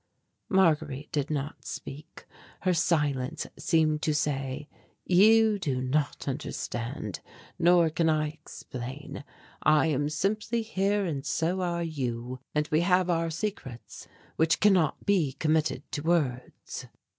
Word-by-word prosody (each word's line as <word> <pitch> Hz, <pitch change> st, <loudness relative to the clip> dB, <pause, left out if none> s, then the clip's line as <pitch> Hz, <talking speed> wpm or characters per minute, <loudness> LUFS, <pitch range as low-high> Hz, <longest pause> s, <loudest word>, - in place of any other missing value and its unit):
Marguerite 155 Hz, -7 st, +2 dB
did 145 Hz, -1 st, -1 dB
not 145 Hz, -1 st, -3 dB
speak; 145 Hz, +3 st, -8 dB, 0.4 s
her 185 Hz, -1 st, +2 dB
silence 150 Hz, -6 st, 0 dB
seemed 155 Hz, -2 st, +2 dB
to 155 Hz, -2 st, +1 dB
say: 140 Hz, -1 st, -2 dB, 0.4 s
"You 215 Hz, +3 st, +5 dB
do 140 Hz, -8 st, -1 dB
not 140 Hz, +4 st, -1 dB
understand, 120 Hz, -, -4 dB, 0.4 s
nor 170 Hz, -1 st, +5 dB
can 160 Hz, +1 st, +1 dB
I 155 Hz, -1 st, +1 dB
explain 145 Hz, -2 st, -8 dB, 0.4 s
I 155 Hz, +1 st, +4 dB
am 145 Hz, +1 st, 0 dB
simply 215 Hz, +8 st, -1 dB
here 200 Hz, -1 st, 0 dB
and 145 Hz, -6 st, -3 dB
so 175 Hz, +6 st, 0 dB
are 170 Hz, -1 st, -1 dB
you, 130 Hz, -5 st, -3 dB, 0.2 s
and 150 Hz, 0 st, +1 dB
we 155 Hz, +2 st, +3 dB
have 180 Hz, 0 st, +3 dB
our 165 Hz, -1 st, +1 dB
secrets 160 Hz, -, -6 dB, 0.3 s
which 160 Hz, 0 st, +3 dB
cannot 185 Hz, -7 st, +3 dB
be 175 Hz, -10 st, +2 dB
committed 155 Hz, -3 st, 0 dB
to 145 Hz, -, -3 dB
words." 145 Hz, -7 st, -2 dB
155 Hz, 125 wpm, -28 LUFS, 140-175 Hz, 0.4 s, You